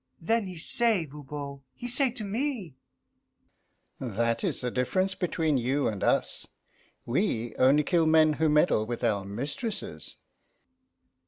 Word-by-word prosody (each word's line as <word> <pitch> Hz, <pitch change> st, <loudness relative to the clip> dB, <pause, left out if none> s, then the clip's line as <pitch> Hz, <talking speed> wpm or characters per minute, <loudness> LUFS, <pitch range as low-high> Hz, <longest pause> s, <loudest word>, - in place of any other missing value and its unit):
Then 220 Hz, +4 st, 0 dB
he 180 Hz, -2 st, -8 dB
say, 210 Hz, +1 st, +3 dB
Voban, 140 Hz, -1 st, -8 dB
he 245 Hz, -, -7 dB
say 260 Hz, +2 st, +6 dB
to 235 Hz, -2 st, -6 dB
me, 215 Hz, -, -3 dB, 1.3 s
"That 115 Hz, -1 st, -1 dB
is -, -, -2 dB
the 125 Hz, -1 st, -2 dB
difference 185 Hz, +11 st, 0 dB
between 160 Hz, -6 st, 0 dB
you 135 Hz, +4 st, 0 dB
and 105 Hz, -3 st, -3 dB
us. -, -, 0 dB, 0.6 s
We 120 Hz, -, -1 dB
only 135 Hz, +4 st, +4 dB
kill 165 Hz, +1 st, +2 dB
men 155 Hz, -1 st, +5 dB
who 160 Hz, -, +3 dB
meddle 150 Hz, -8 st, +2 dB
with 120 Hz, +1 st, -5 dB
our 105 Hz, -4 st, +1 dB
mistresses!" 140 Hz, -, -6 dB
150 Hz, 135 wpm, -27 LUFS, 125-190 Hz, 1.3 s, say